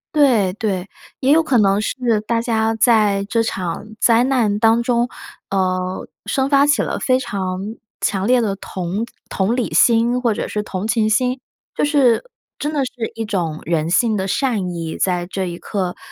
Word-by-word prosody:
对 235 -11 +4
对， 195 -3 -2 0.3
也 270 +2 +3
有 325 +1 +4
可 270 -5 +2
能 200 -1 +3
是 230 -1 0
大 230 +1 0
家 225 -1 0
在 215 -3 +3
这 230 +3 0
场 185 -4 -3
灾 230 0 +4
难 235 -6 +1
当 225 +1 +4
中， 240 0 +1 0.4
呃， 185 -1 -1 0.2
生 265 0 0
发 280 0 +5
起 290 0 +3
了 - - -2
非 255 -1 +2
常 190 -6 -3 0.4
强 195 -1 0
烈 250 +3 +4
的 210 -4 0
同 190 +2 -4 0.2
同 205 +5 0
理 245 - -2
心， 235 +1 +4
或 235 -3 +2
者 - - -3
是 210 - -3
同 195 0 -4
情 225 -2 +1
心。 250 +3 +1 0.3
就 - - 0
是 280 -6 +3 0.3
真 295 - -2
的 285 -3 0
是 245 -3 -5
一 225 - -3
种 175 -7 -2
人 165 -1 0
性 220 +5 +2
的 190 -2 -1
善 210 -3 0
意， 165 -2 -4
在 180 -2 0
这 190 0 -3
一 170 -1 -5
刻 185 -3 -3
220 Hz, 195 characters per minute, -19 LUFS, 190-245 Hz, 0.4 s, 发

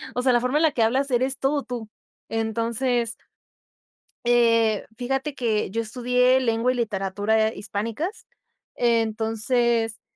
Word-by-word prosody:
O 250 - 0
sea, 255 -1 +3
la 240 - +4
forma 250 +4 0
en 325 - +2
la 315 - +4
que 235 - +1
hablas, 265 +5 +1
eres 260 +2 0
todo 280 +1 0
tú. 235 -3 -6 0.4
Entonces, 230 +2 -1 1.1
eh, 230 -3 +3
fíjate 270 +4 -2
que 220 -7 -1
yo 230 +3 -1
estudié 250 +3 +2
lengua 230 0 +1
y 255 - -4
literatura 215 0 0
hispánicas. 230 - -4 0.5
Entonces, 225 0 +1
235 Hz, 130 wpm, -24 LUFS, 225-255 Hz, 1.1 s, la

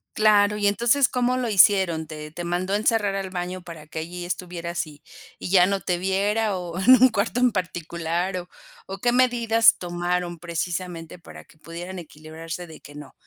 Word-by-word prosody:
Claro, 210 -1 +4
y 205 -1 +1
entonces, 235 +6 +3
¿cómo 250 0 0
lo 250 -2 -1
hicieron? 190 -6 +4
¿Te 150 -1 -8
te 175 +1 -6
mandó 180 +3 -2
encerrar 210 -1 +1
al 195 -1 -4
baño 180 0 -4
para 165 -3 -11
que 155 +1 -7
allí 175 +2 -6
estuvieras 175 -1 -4
y 150 -1 -15 0.4
y - - -6
ya 180 -1 +6
no 195 +1 -1
te 180 - -1
viera?, 200 +3 0
o 175 -1 -5
en 190 +7 +5
un 260 - +8
cuarto 225 +2 -1
en 250 -1 +4
particular 175 -1 -3
o 180 -1 -7 0.4
o 195 +1 -7
¿qué 240 +4 +1
medidas 235 -2 +4
tomaron? 175 0 -3
Precisamente 170 0 -5
para 165 - -13
que - - -24
pudieran 175 +4 -8
equilibrarse 160 +2 -9
de 160 -2 -13
que: 145 - -14
"No, 150 - -11
180 Hz, 185 wpm, -24 LUFS, 170-205 Hz, 0.4 s, un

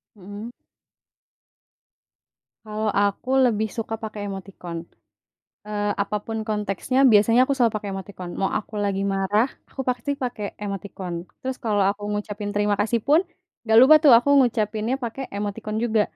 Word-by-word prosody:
Mhm. 205 +4 -9 2.1
Kalau 215 0 -3
aku 205 +5 -1
lebih 220 -3 +2
suka 225 0 -3
pakai 215 -1 -5
emoticon. 185 -3 -7 0.9
Eee, 205 -1 -1
apapun 210 +2 -3
konteksnya, 210 +4 -1
biasanya 225 +4 +5
aku 260 - -1
selalu 240 -4 +2
pakai 210 -1 -4
emoticon, 190 -2 -7
mau 195 - +2
aku 210 - -15
lagi 195 -1 -1
marah 205 +5 +2 0.2
aku 265 - -5
pasti 250 +2 -1
pakai 240 -4 -3 0.2
emoticon. 195 -2 -5 0.3
Terus 260 0 -3
kalau 205 -3 +2
aku 205 +1 -4
ngucapin 205 0 -4
terima 205 0 +2
kasih 225 +3 +1
pun, 300 +3 +6 0.4
nggak 220 -1 +3
lupa 300 +4 +9
tuh 290 - +8
aku 245 +4 0
ngucapinnya 225 -1 +1
pakai 240 +3 -4
emoticon 210 +1 -4
juga, 220 -2 +2
210 Hz, 140 wpm, -23 LUFS, 205-230 Hz, 2.1 s, lupa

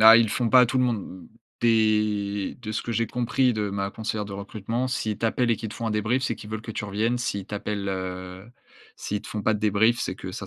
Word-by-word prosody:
Ah, 110 +1 +10
ils 115 - +6
le 110 - -2
font 120 +1 0
pas 130 - +8
à 125 - +6
tout 130 +3 0
le 125 - +4
monde. 100 -6 -3 0.3
Des 105 -3 +2
de 110 -2 -5
ce 110 - -2
que 115 - -3
j'ai 115 0 +1
compris 125 +2 +1
de 105 -3 -1
ma 100 0 -2
conseillère 110 0 -3
de 100 - -8
recrutement, 110 +5 -3
s'ils 110 -4 -1
t'appellent 120 +2 +1
et 115 - +3
qu'ils 110 - -5
te 105 - -8
font 115 - -4
un - - 0
débrief, 110 +5 +1
c'est 125 -3 0
qu'ils 105 - -11
veulent 110 0 -3
que 115 - -6
tu 105 - -3
reviennes. 110 +4 0
S'ils 100 -5 -2
t'appellent, 105 -1 -3
heu, 95 0 -5 0.5
s'ils 105 0 -3
te - - -10
font 105 - -3
pas 110 - +3
de 105 - -3
débrief, 110 +3 +3
c'est 90 - -2
que 95 -1 -7
ça 95 0 -6
110 Hz, 265 wpm, -26 LUFS, 100-115 Hz, 0.5 s, Ah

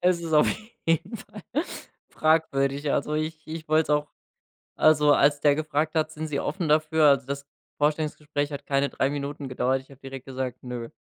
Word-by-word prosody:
Es 180 -1 +3
ist 165 -1 -5
auf 150 - +6 0.4
jeden 165 +7 +1
Fall 210 0 -12 0.7
fragwürdig. 145 -3 +1
Also, 150 +2 0
ich 155 0 -3
ich 160 0 -7
wollte 155 +1 +4
es - - -6
auch 150 0 +2 0.7
also, 150 -1 +5
als 145 0 +4
der 145 -1 +5
gefragt 155 +1 -1
hat: 155 0 +1
„Sind 155 0 -5
Sie 140 -2 -1
offen 170 +1 -2
dafür”? 155 0 +4
Also, 140 -2 +3
das 140 0 -5 0.3
Vorstellungsgespräch 150 -1 -1
hat 140 - -6
keine 140 0 +2
3 135 - 0
Minuten 145 -1 -4
gedauert, 130 +1 0
ich 135 - -25
habe 135 -1 -15
direkt 135 -1 -9
gesagt: 130 -1 -4
„Ne”. 120 -2 -6
150 Hz, 185 wpm, -26 LUFS, 140-155 Hz, 0.7 s, auf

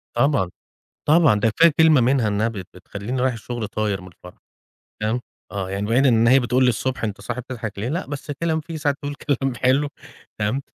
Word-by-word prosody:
طبعًا، 120 -7 +2 0.6
طبعًا، 155 -8 +5
ده 115 +2 +3
كفاية 165 +9 +5
كلمة 160 -4 +6
منها 125 -1 +2
إنها 105 +2 +1
بت 100 -6 -6
بتخلّيني 100 +7 -5
رايح 130 0 +2
الشغل 115 0 -5
طاير 105 -2 -2
من 90 - -11
الفرحة. 90 0 -15 0.6
فاهم؟ 110 +3 0 0.3
آه، 95 -2 -3
يعني 100 +1 -2
بعيد 125 +5 +3
إن 115 -2 +4
هي 135 +2 +6
بتقول 125 +1 +1
لي - - +5
الصبح: 125 +1 -1
"أنت 105 -2 -4
صاحي 120 +1 -4
بتضحك 115 -5 -6
ليه؟" 110 +4 -2
لأ 170 +7 -2
بس 145 +1 -6
كلام 160 +2 -1
فيه 165 +1 -7
ساعات 145 -2 0
تقول 145 0 -4
كلام 135 -2 -1
حلو 130 +4 +2 0.5
تمام؟ 110 +6 -1
125 Hz, 200 wpm, -22 LUFS, 105-140 Hz, 0.6 s, كلمة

